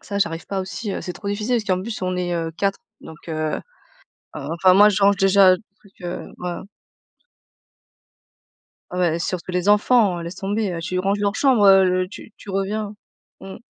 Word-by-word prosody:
Ça, 200 - -5
j'arrive 165 -5 -1
pas 195 -1 -2
aussi, 195 +2 -5
heu, - - -4
c'est 180 - -5
trop 200 +3 -7
difficile 210 +4 -1
parce 220 - -2
qu'en 185 -2 0
plus 220 +2 -6
on 185 0 -1
est, 175 -1 -2
heu 165 -1 -2
4, 195 -1 0 0.2
donc 160 - -11
heu 155 -1 -2 0.8
oh, - - -5
enfin 180 +2 +4
moi, 205 +2 +7
je 205 -1 0
range 200 0 +5
déjà 195 -1 +5
des - - -18 0.2
trucs, 200 -2 -24
heu, 175 0 -5
voilà. 180 -1 -5 2.3
Ouais, 175 -2 0
surtout 180 +1 -4
les 180 +2 -1
enfants, 210 -3 +3
laisse 170 +2 -7
tomber, 200 -2 -2
tu 180 +2 -3
ranges 195 +2 0
leur 200 0 0
chambre, 245 -5 +3
heu, 185 -1 +4
tu 210 - -12
tu - - -15
reviens 200 +2 -2 0.5
mmh. 195 0 -9
195 Hz, 185 wpm, -21 LUFS, 180-205 Hz, 2.3 s, moi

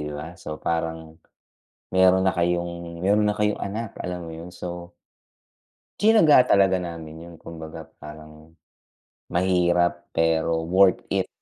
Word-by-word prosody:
diba 75 +2 -6
so 75 0 -6
parang 80 -1 -4 0.7
meron 95 0 +4
na - - +1
kayong 85 -1 -2
meron 105 +3 +2
na 105 - +2
kayong 105 0 0
anak, 110 +2 -5
alam 90 0 -4
mo - - -8
yun 85 +2 -10
so 85 -1 -8 1.0
tsinaga 210 -8 +5 0.2
talaga 95 -1 +4
namin 85 -3 -7
yun 85 -1 -12
kumbaga 80 -1 -9 0.2
parang 75 +1 -13 0.8
mahirap 85 -1 +1
pero 80 0 +1
worth 95 +2 +3
it, - - 0
85 Hz, 125 wpm, -24 LUFS, 80-95 Hz, 1.0 s, tsinaga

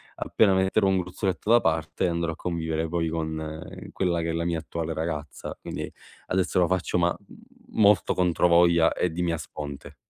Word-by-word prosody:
appena 100 -3 +2
metterò 95 +2 +2
un 95 -1 +3
gruzzoletto 90 +2 -3
da 120 0 +6
parte, 80 +1 0
andrò 85 -1 -1
a - - -10
convivere 80 -2 -2
poi 85 -1 0
con 80 -1 -4 0.3
quella 90 -2 0
che 85 0 -1
è - - -3
la 85 0 -1
mia 85 -2 0
attuale 80 0 -4
ragazza. 75 -2 -5
Quindi, - - -5 0.4
adesso 90 0 +1
lo 90 - +4
faccio 95 -1 0
ma, 85 0 +2
mhmm, - - -18 0.5
molto 100 -3 +5
controvoglia 85 -1 +4
e 90 - 0
di 90 +2 -2
mia 85 -1 0
sponte. 75 -2 -8
85 Hz, 180 wpm, -26 LUFS, 80-90 Hz, 0.5 s, da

